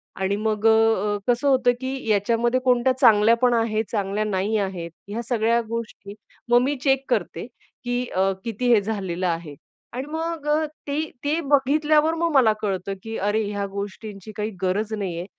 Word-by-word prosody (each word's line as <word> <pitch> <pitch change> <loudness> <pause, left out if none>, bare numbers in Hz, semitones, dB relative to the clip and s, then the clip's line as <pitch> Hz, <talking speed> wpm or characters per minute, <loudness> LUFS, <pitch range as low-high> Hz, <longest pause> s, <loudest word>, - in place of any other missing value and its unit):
आणि 190 +1 -1
मग 215 0 -2
अ, 220 -2 +3
कसं 245 +3 +1
होतं, 255 -2 +4
की 260 -2 -4
याच्यामध्ये 230 +4 +2
कोणत्या 250 0 +3
चांगल्या 220 0 +6
पण 250 -1 +4
आहेत, 225 -2 +1
चांगल्या 205 -1 -1
नाही 210 +1 0
आहेत. 185 -4 -3 0.2
ह्या 220 +3 -3
सगळ्या 235 -1 +2
गोष्टी 225 -3 -6 0.4
मग 240 - +7
मी 275 +3 0
चेक 270 -1 +2
करते, - - -2 0.4
की 245 0 -1
अ, 190 +1 +2
किती 235 +2 +1
हे 215 - +5
झालेलं 190 -4 -3
आहे. 165 -3 -3 0.4
आणि 255 +2 -4
मग 325 -1 -4 0.4
ते 285 +1 -1 0.2
ते 300 +3 0
बघितल्यावर 300 +3 +3
मग 335 0 0
मला 255 -6 +5
कळतं, 195 -2 -2
की 225 0 -6
अरे 205 +3 0
ह्या 205 -1 -3
गोष्टींची 200 +1 -7
काही 210 0 -2
गरज 205 +4 -1
नाहीये, 180 -5 -3
220 Hz, 165 wpm, -23 LUFS, 200-250 Hz, 0.4 s, मग